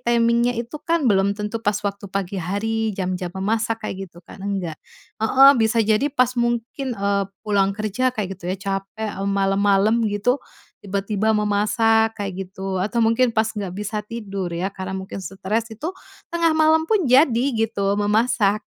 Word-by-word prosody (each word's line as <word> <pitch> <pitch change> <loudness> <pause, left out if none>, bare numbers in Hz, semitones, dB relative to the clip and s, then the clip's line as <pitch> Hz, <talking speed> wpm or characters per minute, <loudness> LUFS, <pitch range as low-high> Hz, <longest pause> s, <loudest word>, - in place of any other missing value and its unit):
timing-nya 235 0 +2
itu 235 +5 -4
kan 335 -2 +1
belum 200 -1 +3
tentu 210 +2 -4
pas 205 0 +2
waktu 200 0 -3
pagi 195 0 -2
hari 220 +5 -1
jam-jam 180 -1 -3
memasak 220 +3 -1
kayak 195 0 -4
gitu 175 0 -16
kan, - - -12
enggak. 190 -6 -3 0.4
Heeh, 265 +5 +7
bisa 225 0 +2
jadi 220 +6 +2
pas 255 -2 +2
mungkin, 240 +2 -1
eee, 200 0 +1 0.2
pulang 200 -2 +2
kerja 225 +4 0
kayak 195 -5 -4
gitu 180 0 -3
ya 190 - -3
capek, 195 +2 -4
m 200 - -1
malam-malam 200 +3 +2
gitu, 205 +5 +1 0.5
tiba-tiba 200 +2 0
memasak 220 +2 +2
kayak 200 -1 -3 0.2
gitu 190 0 -5
atau 210 +5 0
mungkin 230 +2 +3
pas 220 0 +2
nggak 205 -4 -5
bisa 210 +1 -4
tidur 200 -5 -5
ya 175 +3 -1
karena 190 -1 -6
mungkin 190 0 -7
stress, 210 +5 -2
itu 260 +9 -5 0.4
tengah 335 -1 +2
malam 315 0 +4
pun 420 -5 +2
jadi 255 -2 +5
gitu 205 -3 0
memasak 210 0 +2
210 Hz, 165 wpm, -22 LUFS, 195-230 Hz, 0.5 s, Heeh